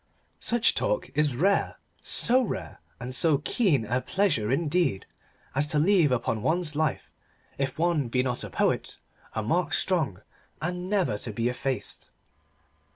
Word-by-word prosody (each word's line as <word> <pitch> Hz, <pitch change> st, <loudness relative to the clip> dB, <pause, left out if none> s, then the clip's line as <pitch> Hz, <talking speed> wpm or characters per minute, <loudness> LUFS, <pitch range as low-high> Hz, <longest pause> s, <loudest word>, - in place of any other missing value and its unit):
Such 235 Hz, -1 st, +2 dB
talk -, -, -1 dB
is 150 Hz, -4 st, +1 dB
rare: 195 Hz, +9 st, +1 dB, 0.2 s
so 255 Hz, +2 st, +3 dB
rare 245 Hz, -, -5 dB, 0.2 s
and 125 Hz, +1 st, -6 dB
so 150 Hz, +4 st, +3 dB
keen 150 Hz, -, +1 dB
a 125 Hz, +4 st, 0 dB
pleasure, 145 Hz, -, 0 dB
indeed, 155 Hz, -, +1 dB, 0.5 s
as 140 Hz, +2 st, +1 dB
to 155 Hz, 0 st, 0 dB
leave 165 Hz, -2 st, +4 dB
upon 115 Hz, -3 st, 0 dB
one's 160 Hz, +2 st, 0 dB
life, 155 Hz, -3 st, -1 dB, 0.5 s
if 135 Hz, -1 st, -1 dB
one 160 Hz, -5 st, +1 dB
be 125 Hz, +2 st, +1 dB
not 125 Hz, -2 st, -1 dB
a -, -, -6 dB
poet, -, -, -1 dB, 0.4 s
a 110 Hz, -, -1 dB
mark 170 Hz, +11 st, 0 dB
strong 155 Hz, -, +1 dB, 0.4 s
and 180 Hz, +3 st, -3 dB
never 190 Hz, -, +1 dB
to 115 Hz, -, -4 dB
be 115 Hz, +3 st, -1 dB
effaced. 130 Hz, +1 st, -3 dB
150 Hz, 150 wpm, -27 LUFS, 125-180 Hz, 0.5 s, leave